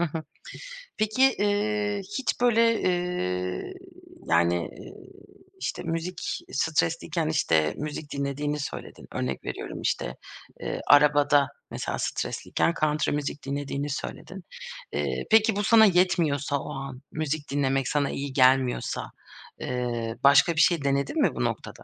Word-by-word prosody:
Hı - - +1
hı. 160 +1 -5 0.8
Peki, 255 +5 +3
ııı, 205 0 0 0.2
hiç 260 - -2
böyle, 230 -1 +4
ııı, 90 - -1 0.5
yani, 85 +1 +3 0.2
ııı, - - -11 0.6
işte, - - -4
müzik 170 +2 -3
stresliyken, 165 +2 0
işte, 80 - +2
müzik 150 0 -5
dinlediğini 145 +1 -2
söyledin. 145 - -7
Örnek 65 0 -3
veriyorum, - - -5
işte, - - -1 0.5
ııı, - - -3
arabada, 145 -1 +5 0.2
mesela, - - -3
stresliyken 170 - -1
country 150 0 +1
müzik 145 0 -3
dinlediğini 140 +1 -3
söyledin. 140 - -6 0.5
Eee, - - -2
peki, 220 -1 +5
bu 205 - 0
sana 220 +1 +7
yetmiyorsa 170 -7 +2
o 150 - -6
an, 135 -1 -7
müzik 155 -2 -3
dinlemek 135 -2 +1
sana 145 -1 +1
iyi 140 -1 -4
gelmiyorsa, 130 -1 +2 0.5
ııı, 120 -2 -3
başka 140 +4 +6
bir 165 - +4
şey 165 -3 +3
denedin 140 - 0
mi - - +2
bu - - -1
noktada? - - -4
145 Hz, 130 wpm, -26 LUFS, 135-180 Hz, 0.8 s, sana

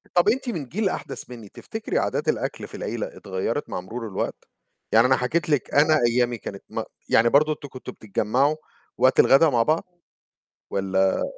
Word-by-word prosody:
طَب 175 +3 +5
أنتِ 250 +3 0
من 165 -11 -3
جيل 195 - -1
أحدث 135 -8 -6
منّي، 115 -5 -10
تفتكري - - -4
عادات - - -1
الأكل - - -2
في - - -10
العيلة - - -3
اتغيّرت 95 +8 -3
مع - - -3
مرور 115 +5 -6
الوقت؟ 95 - -4 0.5
يعني 115 +3 +6
أنا 130 - +4
حكيت 155 +8 -1
لِك 145 -4 0
أنا 155 +2 +5
أيامي 120 0 +1
كانت 100 -2 -8
م - - -3 0.3
يعني 115 +1 +5
برضه 150 +4 +4
أنتم 145 - -10
كنتم 130 -1 -8
بتتجمّعوا 125 +8 0 0.4
وقت 130 - +3
الغدا 155 +4 +6
مع 120 -4 +3
بعض؟ 155 +7 +1 0.9
والّا 95 -1 +1
125 Hz, 175 wpm, -24 LUFS, 110-155 Hz, 0.9 s, يعني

